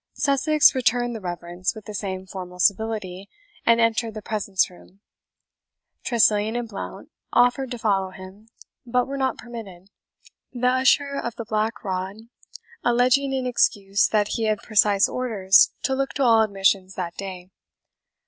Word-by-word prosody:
Sussex 295 +1 +3
returned 245 -1 0
the 220 - -7
reverence 175 +1 -4
with 220 - -11
the 210 - -8
same 190 -2 -4
formal 185 -1 -8
civility, 200 -2 -1 0.4
and 230 0 +5
entered 230 -1 +1
the 215 - -6
presence 200 -3 0
room. 185 +1 -18 1.0
Tressilian 220 -2 +2
and 240 -1 -3
Blount 205 -3 -8 0.2
offered 245 +2 +3
to 245 - -5
follow 195 -4 0
him, 190 +4 -13 0.3
but 250 0 0
were 275 - -6
not 265 -1 -1
permitted, 200 -6 -10 0.6
the 250 -1 -3
Usher 265 +2 +2
of 235 -1 -5
the 230 - -6
Black 220 +2 -2
Rod 190 0 -3 0.7
alleging 250 +3 +2
in 260 -1 -2
excuse 200 -5 +2
that 210 -1 +1
he 225 - -1
had 215 -1 -1
precise 205 -2 +3
orders 210 -7 +3
to 265 - 0
look 270 0 -2
to 280 - 0
all 230 -3 +5
admissions 195 -2 +1
that 175 -2 -4
day. 185 -2 -8
220 Hz, 150 wpm, -23 LUFS, 195-245 Hz, 1.0 s, and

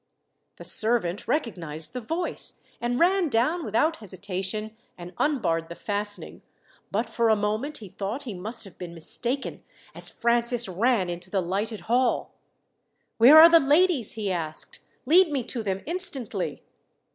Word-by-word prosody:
The - - -12
servant 215 -4 +3
recognized 165 - -2
the 250 - -5
voice, 330 +9 0 0.2
and 240 +1 -1
ran 360 -1 +2
down 265 +9 0
without 305 +8 0
hesitation 200 +2 -5 0.2
and 175 +1 -10
unbarred 165 - 0
the 170 - -8
fastening; 205 +1 -2 0.5
but 220 +4 -2
for 230 0 0
a 220 - +4
moment 215 +8 -2
he 205 -4 -11
thought 210 +9 -5
he 235 - -6
must 215 +6 -1
have 195 -4 -15
been 175 -1 -8
mistaken, 240 - -1 0.3
as - - -4
Francis 235 0 +1
ran 200 +1 0
into 175 +1 -5
the 195 - -1
lighted 200 +5 -3
hall. 245 +2 0 0.9
"Where 260 +7 +8
are 325 - +11
the 335 0 +6
ladies?" 295 - +2
he 210 -3 -3
asked. 160 -3 0 0.3
"Lead 335 +4 +5
me 270 -4 -1
to 235 0 -5
them 195 -2 -3
instantly." 255 - -1
225 Hz, 150 wpm, -25 LUFS, 190-265 Hz, 0.9 s, are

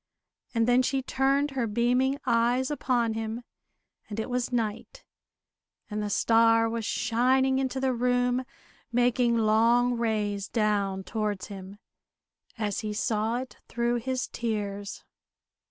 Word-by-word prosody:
and 230 0 +2
then 245 +1 +5
she 265 +1 0
turned 275 +2 +1
her 255 -4 -1
beaming 250 +5 +1
eyes 245 +2 +2
upon 240 -6 0
him, 225 +2 -4 0.7
and 210 0 -5
it 220 - -3
was 250 0 -1
night; 235 - -3 0.9
and 210 0 -2
the 210 - -2
star 225 +2 +4
was 230 0 -3
shining 255 +4 +2
into 265 0 -1
the 260 -1 +1
room, 245 +1 +1 0.5
making 245 0 +2
long 230 +3 +3
rays 210 -3 -1
down 205 -4 0
towards 210 -1 -3
him 195 0 -9 0.8
as 210 -3 -2
he 215 -1 -3
saw 220 0 0
it 255 +1 -7
through 240 +1 0
his 255 +2 -2
tears. 205 -3 -4
235 Hz, 130 wpm, -27 LUFS, 215-250 Hz, 0.9 s, then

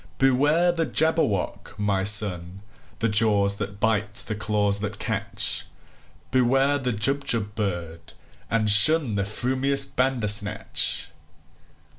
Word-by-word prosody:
"Beware 145 +7 +1
the 165 -2 -3
Jabberwock, 160 - -1
my 100 -2 -2
son! 95 -2 +3 0.3
The 115 - -1
jaws 105 -2 +1
that 100 0 -7
bite, 105 -2 -1
the 115 0 -1
claws 105 -1 -1
that 105 +1 -6
catch! - - -1 0.6
Beware 135 +3 +1
the 125 -2 -3
Jubjub 115 -2 -1
bird, 85 -6 -6 0.4
and 110 -1 -1
shunThe 105 -1 +4
frumious 130 +5 0
Bandersnatch!" 110 -6 0
105 Hz, 105 wpm, -23 LUFS, 100-135 Hz, 0.6 s, shunThe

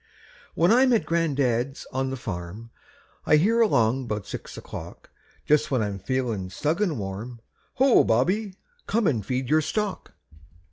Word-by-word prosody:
When 170 +4 +3
I'm 255 +2 +5
at 225 - +2
gran'dad's 140 -6 0
on 130 0 -1
the 135 - -4
farm, 105 +2 -7 0.6
I - - +6
hear 220 +10 +3
along 125 - +2
'bout 105 -3 -3
six - - -8
o'clock, - - -9 0.3
Just 150 0 +3
when 130 -5 +1
I'm 100 -1 -4
feelin' 110 -3 -2
snug 155 - -1
an' 175 -9 0
warm, 105 +4 -6 0.4
"Ho, 265 -1 +5
Bobby, 185 - +1 0.3
come 225 0 +1
and 120 - +1
feed 130 +4 -2
your 155 +4 +3
stock." 210 +5 -3
130 Hz, 150 wpm, -25 LUFS, 115-175 Hz, 0.6 s, I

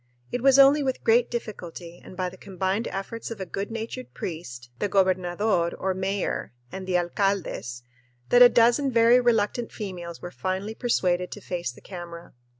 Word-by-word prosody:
It 245 - -2
was 270 +1 +5
only 275 +2 +7
with 260 -2 -2
great 230 +1 +4
difficulty 175 -7 -7
and 185 - -12
by 185 -1 -1
the 185 - -13
combined 190 +3 -2
efforts 205 +4 -5
of 230 -3 -7
a 190 - -3
good 195 +3 -4
natured 220 - -6
priest, 125 -8 -7
the 205 - 0
gobernador 185 -1 +1
or 190 0 -1
mayor, 190 -6 -2 0.2
and 190 -1 -7
the 180 -1 +2
alcaldes 175 - -1 0.5
that 245 - +6
a 245 - +11
dozen 240 +4 +4
very 235 +1 +6
reluctant 230 0 +1
females 175 -5 -6
were 175 - -7
finally 190 +4 -3
persuaded 180 -7 0
to - - -9
face 175 -6 -4
the - - -16
camera. 175 -2 -9
190 Hz, 170 wpm, -26 LUFS, 175-230 Hz, 0.5 s, a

